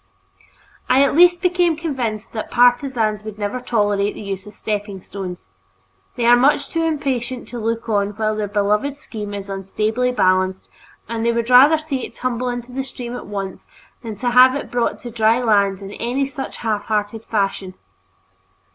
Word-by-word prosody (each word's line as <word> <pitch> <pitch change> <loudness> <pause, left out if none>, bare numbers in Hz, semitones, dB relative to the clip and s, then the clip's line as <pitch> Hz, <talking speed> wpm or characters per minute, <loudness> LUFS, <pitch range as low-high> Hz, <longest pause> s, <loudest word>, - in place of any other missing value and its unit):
I 265 +2 +5
at 280 - +1
least 350 +1 +6
became 355 -3 +2
convinced 250 -10 -3
that 220 - -4
partisans 245 -3 +2
would 215 -1 -8
never 205 +4 -3
tolerate 205 -4 0
the - - -8
use 195 0 -5
of 210 - -12
stepping 205 -2 -4
stones. 185 - -8 0.7
They 240 - -1
are 240 +1 +7
much 275 +2 +3
too 330 - -1
impatient 265 -6 -2
to 245 - -6
look 230 +1 -2
on 205 -2 +1
while 215 0 -1
their 210 -1 -2
beloved 210 +7 0
scheme 210 -7 -7
is 200 -1 -6
unstably 215 +5 -1
balanced, 185 -4 +1 0.4
and 225 0 -3
they 235 - +3
would 235 +1 -1
rather 275 +6 +8
see 295 -5 -4
it - - -8
tumble 250 0 -2
into 245 0 -5
the 265 +2 -3
stream 245 -2 -7
at - - -8
once 195 -2 -6 0.3
than 225 -3 -6
to 245 +4 -1
have 255 +2 +7
it 285 - -5
brought 245 -1 0
to 240 - -7
dry 225 +1 +3
land 200 -4 +2
in 195 - -8
any 250 +6 -1
such 270 0 -6
half 215 -3 -2
hearted 215 +1 -2
fashion. 195 -3 -2
230 Hz, 180 wpm, -20 LUFS, 205-255 Hz, 0.7 s, rather